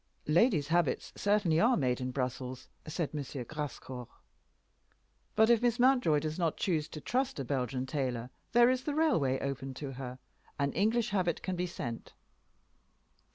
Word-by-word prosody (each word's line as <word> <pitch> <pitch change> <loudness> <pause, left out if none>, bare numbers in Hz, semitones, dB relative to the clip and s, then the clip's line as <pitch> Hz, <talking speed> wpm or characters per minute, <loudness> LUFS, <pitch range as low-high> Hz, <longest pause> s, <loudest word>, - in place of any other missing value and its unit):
"Ladies' 160 - +3
habits 170 -4 +1
certainly 200 -6 +2
are 240 +5 +4
made 125 -3 0
in 130 - -2
Brussels," 130 0 -4 0.2
said 155 0 -2
M. 150 - -2 0.2
Grascour. 130 -4 -6 1.3
"But 220 +2 +5
if 235 -1 +4
Miss 240 -1 +2
Mountjoy 250 - +4
does 155 +3 -3
not 165 -3 0
choose 155 -5 0
to 155 - -8
trust 250 - -1
a 135 - -3
Belgian 130 0 -1
tailor 130 -3 -2 0.2
there 240 +1 +6
is 255 0 -1
the 295 - -1
railway 165 - +2
open 135 -1 -4
to 140 0 -5
her. 130 -1 -6 0.4
An 140 -1 0
English 225 +5 +2
habit 180 -4 0
can 185 - -2
be 180 +1 -1
sent." 120 -9 -6
155 Hz, 155 wpm, -32 LUFS, 130-210 Hz, 1.3 s, there